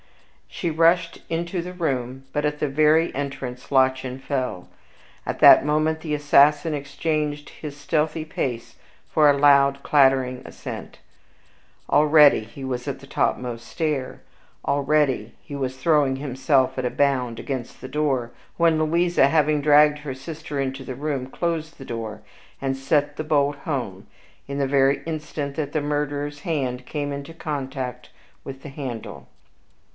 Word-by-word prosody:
She 170 - -3
rushed 165 +1 +2
into 170 +2 -2
the 180 +1 -7
room, 135 -6 -3
but 150 - 0
at 150 0 -1
the 150 - 0
very 155 +3 +3
entrance 135 -3 -5
Lottchen 130 -1 +2
fell. 130 -9 -3 0.6
At - - -4
that - - +9
moment 155 +1 +1
the 155 -2 -2
assassin 145 +2 +4
exchanged 145 +1 -2
his 145 -2 -9
stealthy 155 +1 -1
pace 125 -6 -4 0.3
for 150 -2 +5
a 140 - +4
loud 140 -1 +5
clattering 130 -3 +3
ascent. - - -8 0.9
Already 150 -3 +6
he 115 +5 -11
was 125 0 -4
on 140 - -3
the 140 - -14
topmost 120 -3 -1
stair; 150 -5 -3 0.4
already 140 -5 +1
he 145 - -9
was 130 -2 -3
throwing 145 -2 +2
himself 130 -1 +1
at 130 - -1
a - - +1
bound 125 -4 0
against 130 -4 -5
the - - -8
door, 135 -4 -1 0.3
when 165 -2 +3
Louisa, 170 -2 +3
having 150 -1 +2
dragged 150 0 +5
her 145 -3 -6
sister 150 +1 -6
into 135 0 -3
the 130 0 -6
room, 140 -2 -3
closed 165 +2 -3
the 135 - -10
door 110 -2 -6 0.4
and 135 -1 -1
sent 145 +2 0
the 155 - -4
bolt 145 -2 +1
home 120 -11 -4 0.4
in 140 0 -4
the 140 -1 +1
very 135 0 +3
instant 150 -3 -4
that 155 -3 -3
the 155 - -1
murderer's 145 0 -2
hand 130 -7 -2
came 145 -2 -3
into 140 +3 -7
contact 130 -5 -5 0.3
with 135 0 -9
the 145 - -7
handle. 120 - -7
140 Hz, 150 wpm, -23 LUFS, 130-150 Hz, 0.9 s, that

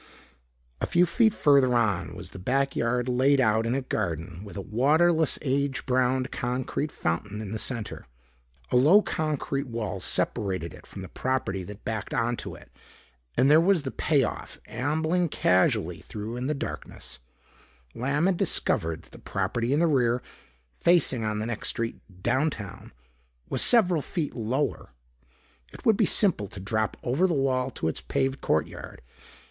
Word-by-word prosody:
A - - 0
few 175 +1 +4
feet 225 +4 +3
further 140 -8 +4
on 100 -9 0
was - - -9
the 95 - -9
backyard 125 +1 0
laid 130 +3 +3
out 110 -2 +2
in 120 - 0
a 135 - -1
garden 85 -5 -3
with 100 -1 -9
a - - -3
waterless 155 - +3
age 140 -1 0
browned 130 0 +1
concrete 130 +4 -2
fountain 100 +6 -3
in 105 -3 -6
the 110 - -3
center. 115 -3 -5 0.6
A - - +1
low 165 +12 +6
concrete 145 -3 -2
wall 115 -4 -4
separated 95 -3 0
it - - -14
from 95 - -8
the - - -7
property 115 -8 -2
that 100 +1 -11
backed 110 -3 -3
onto 120 +1 -2
it. - - -16 0.7
And 135 +3 +5
there 155 +2 +7
was 180 -3 +3
the 135 - -3
payoff. 140 -6 -1
Ambling 155 +8 0
casually 90 -8 +2
through 110 +2 -6
in 125 +1 -3
the 150 - 0
darkness, 65 - -7 0.7
Lamb 140 +6 0
had 190 -2 +2
discovered 80 - 0
that - - -21
the - - -12
property 115 +6 -2
in 145 - +3
the 170 - +4
rear, 125 -6 +2 0.5
facing 140 - +3
on 105 -1 -1
the 105 - -2
next 115 -2 -4
street 115 0 -3 0.2
downtown, 130 -8 -1 0.6
was - - 0
several 185 -9 +4
feet 160 0 -3
lower. 120 - -2 0.8
It - - -13
would 220 - +5
be - - +2
simple 180 - +3
to 95 - -9
drop 110 +3 -1
over 140 +10 +2
the 170 - 0
wall 130 -2 +1
to 80 - -3
its 80 -3 -2
paved 135 - -1
courtyard. 80 - -2
125 Hz, 160 wpm, -27 LUFS, 105-145 Hz, 0.8 s, there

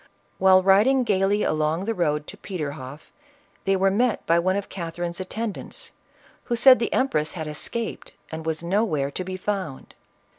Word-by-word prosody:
While 185 0 +6
riding 215 +8 +5
gaily 200 -1 +2
along 155 +4 0
the 225 - 0
road 150 -6 0
to - - -10
Pe 190 - -7
terhofl", 140 -2 -6 0.6
they 195 - +3
were 195 0 +3
met 235 +2 +1
by 170 +1 +3
one 185 +2 +1
of 200 0 -3
Catherine's 170 0 -5
attendants, 225 - -5 0.5
who 240 - 0
said 255 +2 +7
the 235 - -1
empress 155 - +1
had 160 -3 -5
escaped 215 +9 -4 0.2
and 160 0 -5
was 160 0 -3
nowhere 170 -7 0
to 185 - -4
be 185 +1 -5
found. 185 -8 -4
185 Hz, 170 wpm, -24 LUFS, 160-210 Hz, 0.6 s, said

